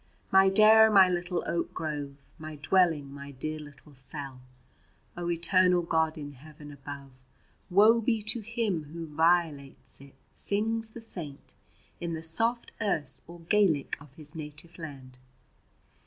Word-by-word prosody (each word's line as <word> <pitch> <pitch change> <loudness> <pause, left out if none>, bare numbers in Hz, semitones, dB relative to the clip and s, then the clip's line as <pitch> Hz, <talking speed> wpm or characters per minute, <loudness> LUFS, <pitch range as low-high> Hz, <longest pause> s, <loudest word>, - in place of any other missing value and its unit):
My 190 0 +6
Daire, 220 +2 +7
my 195 -3 +7
little 180 0 -2
oak 170 0 -3
grove, 145 -3 -4 0.2
My 155 0 -8
dwelling, 150 -3 +1
my 140 0 -9
dear 155 +3 -5
little 145 0 -14
cell; 135 0 -4 0.7
O 175 0 -4
Eternal 180 +1 +3
God 160 -1 0
in 145 -1 -7
Heaven 150 +2 -13
above, 140 -2 -10 0.5
Woe 215 +5 +5
be 225 -1 0
to 215 +3 +3
him 215 -7 -2
who 165 0 -6
violates 160 -4 0
it, 140 -1 -16 0.2
sings 225 +2 -1
the 230 +1 -11
Saint 165 -10 -7 0.5
in 170 -1 -4
the 160 - -7
soft 230 +9 +1
Erse 155 -9 0
or 170 0 -12
Gaelic 170 -5 +1
of 145 -2 -15
his 150 +1 -2
native 160 +2 -8
land. 135 -5 -10
165 Hz, 140 wpm, -28 LUFS, 145-190 Hz, 0.7 s, Daire